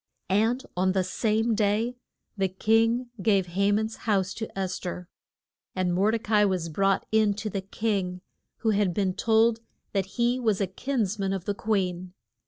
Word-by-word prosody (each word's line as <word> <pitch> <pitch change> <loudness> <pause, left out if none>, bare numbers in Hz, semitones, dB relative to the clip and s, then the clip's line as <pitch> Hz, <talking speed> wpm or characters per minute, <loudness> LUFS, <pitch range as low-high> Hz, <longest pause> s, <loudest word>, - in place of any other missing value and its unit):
And 225 +6 +2
on 185 +1 +2
the 190 -1 +2
same 220 +4 0
day 215 +3 +1 0.4
the 195 -2 +1
king 225 +5 +1
gave 195 -4 +2
Ha 200 +2 +2
man's 220 +2 0
house 195 -2 +2
to 220 - -5
Es 190 -1 -2
ther, 180 -1 -6 0.7
and 185 -1 0
Mor 195 +4 +3
de 225 - +2
ca 215 -1 0
i 210 - +5
was 185 -4 -1
brought 195 +4 +1
in 215 -2 +3
to 215 +1 -4
the 195 - -2
king, 190 -2 -2 0.4
who 220 - +4
had 200 -4 +1
been 190 -2 +1
told 225 +3 +3 0.3
that 195 -2 0
he 240 +1 +2
was 220 -5 +1
a 200 - +2
kins 215 +1 -2
man 195 -1 0
of 190 -2 -4
the 205 - 0
queen. 185 -4 -1
205 Hz, 185 wpm, -27 LUFS, 190-220 Hz, 0.7 s, i